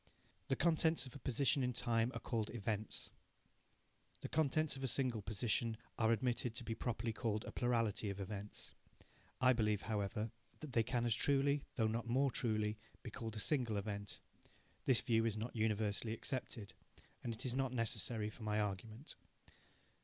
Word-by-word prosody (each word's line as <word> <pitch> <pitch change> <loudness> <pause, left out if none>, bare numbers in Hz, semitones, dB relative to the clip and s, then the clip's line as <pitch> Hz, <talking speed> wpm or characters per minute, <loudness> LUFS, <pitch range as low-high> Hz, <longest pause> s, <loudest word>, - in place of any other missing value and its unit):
The 135 - +2
contents 160 -3 +3
of 130 - -10
a - - -7
position 135 +2 +3
in 125 -1 +1
time 120 0 +2
are - - -2
called 115 -3 -1
events. 110 -2 -3 1.1
The - - -3
contents 155 -1 +2
of 135 - -6
a - - +2
single 125 -3 +1
position 110 +2 0 0.2
are 110 -1 +4
admitted 120 0 +1
to 120 - -4
be 115 - -2
properly 115 -1 -2
called 110 -1 -1
a - - -5
plurality 115 -4 +1
of 100 0 -4
events. 100 +1 -6 0.7
(I 130 0 +6
believe, 105 -3 +1
however, 105 +1 -1 0.3
that 150 -5 -7
they 115 - +5
can 120 +1 0
as 120 - +4
truly, 140 +3 +3
though 115 - +3
not 115 +2 0
more 135 +3 +3
truly, 110 -3 0 0.2
be 120 - -6
called 110 0 -5
a - - -3
single 120 -4 +1
event. 100 0 -3 0.7
This 130 -3 +5
view 115 -2 +3
is 110 -2 +1
not 115 +3 -4
universally 110 0 +1
accepted, 115 -3 -4 0.5
and 120 - -1
it 115 +3 -6
is 125 - +1
not 135 -1 +1
necessary 115 -2 0
for 115 - -14
my 105 -1 +1
argument.) 105 +6 -3
115 Hz, 170 wpm, -39 LUFS, 110-125 Hz, 1.1 s, I